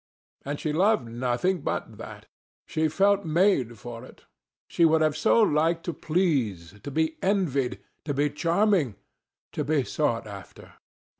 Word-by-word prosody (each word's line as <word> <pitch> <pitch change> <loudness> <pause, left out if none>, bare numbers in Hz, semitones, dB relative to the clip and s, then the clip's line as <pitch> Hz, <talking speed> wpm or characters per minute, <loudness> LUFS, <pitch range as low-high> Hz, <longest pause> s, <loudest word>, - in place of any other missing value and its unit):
And 145 +1 -4
she 150 - -2
loved 180 - +2
nothing 125 +10 -1
but - - -4
that; - - -9 0.4
she 160 0 0
felt 200 +5 +2
made 155 - +2
for 115 +2 -8
that. 130 - -15 0.4
She 170 - +1
would 160 -1 +4
so 225 +1 +4
have 150 - 0
liked 165 +2 +1
to 170 - -3
please, 135 - -1
to 145 - -6
be 160 +2 -1
envied, 165 -10 0 0.3
to 145 - -2
be 145 +1 +1
charming, 170 - +1 0.6
to 150 - -2
be 145 -1 +1
sought 125 -4 -1
after. 100 -3 -11
155 Hz, 150 wpm, -26 LUFS, 125-175 Hz, 0.6 s, would